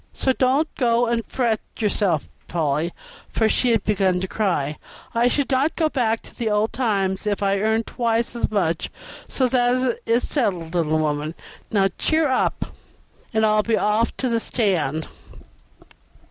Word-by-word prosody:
So 265 Hz, -, +1 dB
don't 265 Hz, +5 st, +2 dB
go 240 Hz, -1 st, +3 dB
and 235 Hz, -1 st, 0 dB
fret 235 Hz, -4 st, 0 dB, 0.2 s
yourself, 200 Hz, -7 st, +1 dB, 0.2 s
Polly" 155 Hz, 0 st, 0 dB, 0.4 s
(for 220 Hz, -, +2 dB
she 245 Hz, +3 st, +2 dB
had 225 Hz, -4 st, +2 dB
begun 190 Hz, -3 st, +2 dB
to 190 Hz, -, -2 dB
cry); 170 Hz, -9 st, -1 dB, 0.3 s
"I 240 Hz, +1 st, +3 dB
would 285 Hz, -1 st, 0 dB
not 270 Hz, +4 st, +2 dB
go 315 Hz, -2 st, +2 dB
back 230 Hz, -5 st, 0 dB
to -, -, -15 dB
the 230 Hz, -2 st, -2 dB
old 210 Hz, +1 st, +1 dB
times 200 Hz, -5 st, 0 dB
if 205 Hz, -1 st, 0 dB
I 195 Hz, 0 st, +2 dB
earned 220 Hz, +2 st, +1 dB
twice 235 Hz, 0 st, -1 dB
as 235 Hz, -, 0 dB
much, 170 Hz, -6 st, 0 dB, 0.4 s
so 260 Hz, -, +2 dB
that 250 Hz, 0 st, +2 dB
is 235 Hz, +2 st, +2 dB
settled, 180 Hz, -, -1 dB
little 160 Hz, -3 st, +1 dB
woman. 155 Hz, +1 st, -1 dB, 0.4 s
Now, 195 Hz, -2 st, +3 dB
cheer 315 Hz, -1 st, +2 dB
up, 260 Hz, -, 0 dB, 0.6 s
and 220 Hz, -1 st, +2 dB
I'll 215 Hz, 0 st, +4 dB
be 225 Hz, +1 st, +1 dB
off 215 Hz, +2 st, +1 dB
to 260 Hz, -, -1 dB
the 230 Hz, -2 st, +1 dB
stand." 165 Hz, -, 0 dB
220 Hz, 160 wpm, -22 LUFS, 190-245 Hz, 0.6 s, I'll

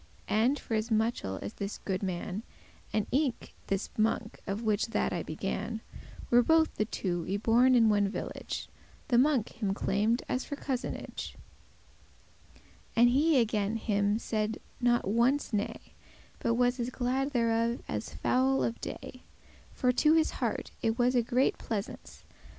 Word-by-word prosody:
And, 235 Hz, +7 st, +3 dB
for 230 Hz, -, -6 dB
as 220 Hz, +1 st, 0 dB
muchel 220 Hz, -, 0 dB
as 100 Hz, -, -5 dB
this 200 Hz, +1 st, -5 dB
goode 185 Hz, -2 st, -1 dB
man, 190 Hz, +1 st, -3 dB, 0.5 s
And 215 Hz, -2 st, +1 dB
eke 270 Hz, -3 st, 0 dB
this 195 Hz, 0 st, -2 dB
monk 220 Hz, +1 st, 0 dB
of 200 Hz, +3 st, -3 dB
which 215 Hz, 0 st, +1 dB
that 225 Hz, -, 0 dB
I 175 Hz, -, -1 dB
began, 195 Hz, +8 st, -4 dB, 0.5 s
Were 240 Hz, 0 st, +7 dB
both 320 Hz, +5 st, +3 dB
the 215 Hz, -, 0 dB
two 175 Hz, -5 st, -2 dB
y 195 Hz, -, +1 dB
born 240 Hz, +4 st, +4 dB
in 230 Hz, -2 st, +6 dB
one 205 Hz, -1 st, +3 dB
village, -, -, -5 dB, 0.4 s
The 240 Hz, -, +5 dB
monk 260 Hz, -4 st, +3 dB
*him 195 Hz, -2 st, 0 dB
claimed, 215 Hz, +5 st, +1 dB
as 255 Hz, -, -1 dB
for 285 Hz, -, -5 dB
cousinage,* 265 Hz, -3 st, -4 dB
*claimed -, -, -21 dB, 1.2 s
kindred -, -, -25 dB, 0.3 s
And 240 Hz, +1 st, +6 dB
he 285 Hz, +3 st, +4 dB
again 215 Hz, -2 st, +1 dB
him 205 Hz, -2 st, +1 dB
said 220 Hz, -1 st, -2 dB, 0.2 s
not 240 Hz, -3 st, +2 dB
once 235 Hz, +6 st, +2 dB
nay, 205 Hz, 0 st, +1 dB
with -, -, -11 dB
him* -, -, -24 dB, 0.5 s
But 230 Hz, -, +1 dB
was 245 Hz, +1 st, +2 dB
as 240 Hz, +1 st, -1 dB
glad 260 Hz, +2 st, -1 dB
thereof 230 Hz, -2 st, +1 dB
as 105 Hz, -9 st, -4 dB
fowl 130 Hz, +7 st, +2 dB
of 115 Hz, -2 st, -2 dB
day; 255 Hz, -, -7 dB, 0.5 s
"For 250 Hz, -, +2 dB
to 305 Hz, +5 st, +4 dB
his 320 Hz, -1 st, +3 dB
heart -, -, -3 dB
it 225 Hz, 0 st, 0 dB
was 245 Hz, +1 st, +3 dB
a 245 Hz, -, +4 dB
great 250 Hz, +3 st, +1 dB
pleasance. 215 Hz, 0 st, -5 dB
225 Hz, 165 wpm, -30 LUFS, 200-245 Hz, 1.2 s, Were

